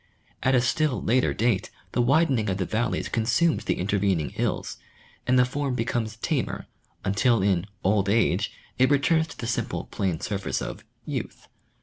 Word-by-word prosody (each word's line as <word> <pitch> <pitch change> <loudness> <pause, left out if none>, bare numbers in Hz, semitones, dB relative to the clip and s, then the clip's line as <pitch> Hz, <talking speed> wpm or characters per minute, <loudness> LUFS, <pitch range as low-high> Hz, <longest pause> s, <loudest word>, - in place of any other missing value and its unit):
At 130 0 +3
a 125 - +4
still 140 +2 +1
later 125 +3 +2
date 110 -3 0 0.2
the 125 - +1
widening 130 -4 +3
of 95 - 0
the 95 - -1
valleys 115 +5 -1
consumes 125 +9 +1
the - - 0
intervening 95 -4 +1
hills, - - -2 0.5
and 125 +1 +4
the 125 - +6
form 135 0 -2
becomes 115 -2 -1
tamer, 130 +1 -2 0.4
until 100 +3 +3
in 95 -2 +1
" 95 - -39
old 100 0 +2
age 100 -2 +2
" - - -31
it 130 - +5
returns 160 +3 +3
to - - -12
the 120 - -5
simple 115 - -2
plain 90 -5 -1
surface 100 -2 -2
of - - -6
" - - -40
youth." - - -5
115 Hz, 180 wpm, -26 LUFS, 100-130 Hz, 0.5 s, the